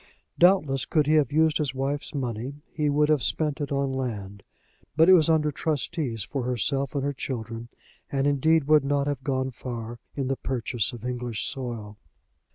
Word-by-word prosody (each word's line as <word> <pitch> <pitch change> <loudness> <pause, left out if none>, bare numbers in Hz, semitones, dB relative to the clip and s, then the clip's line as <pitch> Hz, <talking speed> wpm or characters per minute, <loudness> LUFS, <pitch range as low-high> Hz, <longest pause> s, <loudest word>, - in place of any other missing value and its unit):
Doubtless, 160 -8 +4
could 155 -3 +2
he 155 - +2
have 150 -5 +3
used 155 +1 +3
his 140 -4 -1
wife's 140 +2 -2
money, 130 +2 -4
he 150 -4 0
would 150 +1 +3
have 150 -3 +3
spent 150 - 0
it 145 - -3
on 140 -1 0
land; 105 -7 -4 0.5
but 160 +2 +5
it 185 - +9
was 165 -3 +5
under 155 -2 +3
trustees 145 - -2
for 135 +6 -4
herself 130 +3 -1
and 140 - 0
her 140 0 -1
children, 115 -3 -5 0.4
and 135 0 0
indeed 150 +3 +3
would 150 0 +4
not 140 0 +1
have 145 -2 -3
gone 130 -1 -1
far 120 -1 -6 0.2
in 135 -2 -2
the 135 - 0
purchase 120 -3 -1
of 120 -1 -9
English 125 -3 -3
soil. 115 -5 -5
135 Hz, 180 wpm, -26 LUFS, 120-150 Hz, 0.5 s, it